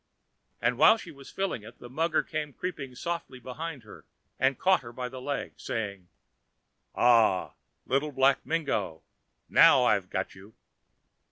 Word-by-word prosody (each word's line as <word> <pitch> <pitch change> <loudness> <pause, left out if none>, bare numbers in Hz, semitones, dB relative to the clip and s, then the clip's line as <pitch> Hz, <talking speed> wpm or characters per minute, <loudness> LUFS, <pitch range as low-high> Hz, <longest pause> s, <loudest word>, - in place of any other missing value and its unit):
And 120 +1 0
while 215 +9 +7
she 175 -6 -10
was 140 -2 -13
filling 195 - -2
it 115 +3 -13
the - - -11
mugger 160 +5 0
came 150 -2 -4
creeping 140 -8 -6
softly 170 -3 -4
down - - -27
behind 145 +1 -6
her 105 - -13 0.4
and 130 0 +2
caught 190 0 +3
her 120 -2 -10
by 125 +1 -5
the 130 0 -9
leg, 140 +2 -4
saying: 100 -5 -5 0.9
"Aha, 115 -6 +4 0.3
Little 140 +3 0
Black 135 0 +3
Mingo, 105 - -2 0.4
now - - +6
I've - - +2
got - - -3
you." 100 +3 -15
130 Hz, 155 wpm, -28 LUFS, 120-155 Hz, 0.9 s, while